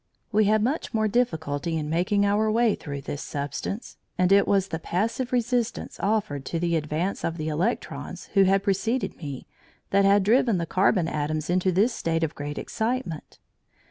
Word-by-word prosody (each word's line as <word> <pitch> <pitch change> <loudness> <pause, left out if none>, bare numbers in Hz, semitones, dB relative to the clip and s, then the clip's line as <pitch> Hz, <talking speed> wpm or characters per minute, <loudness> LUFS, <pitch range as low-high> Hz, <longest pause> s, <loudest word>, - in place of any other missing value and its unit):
We 215 0 +4
had 215 +1 +3
much 265 0 -1
more 220 0 +2
difficulty 165 -8 0
in 150 -1 -3
making 185 +6 +1
our 210 +2 +2
way 230 -1 +3
through 140 -2 -6
this 145 +1 -5
substance, 145 - -5 0.2
and 180 +1 +2
it 200 0 +5
was 195 -1 +2
the 160 - -3
passive 225 +9 -1
resistance 245 -1 -1
offered 200 -10 0
to 165 - -2
the 170 0 +1
advance 160 +5 -2
of 165 0 -2
the 155 -1 -3
electrons 175 +10 -3
who 195 -2 +5
had 195 +1 +3
preceded 225 +5 0
me 140 -5 -7 0.5
that 200 0 +4
had 200 0 +5
driven 230 0 +3
the 170 - -1
carbon 185 0 +2
atoms 155 +1 -2
into 185 +1 +2
this 210 +7 +3
state 165 -4 -1
of 160 -1 -1
great 145 0 -6
excitement. 225 - -3
190 Hz, 175 wpm, -26 LUFS, 160-215 Hz, 0.5 s, it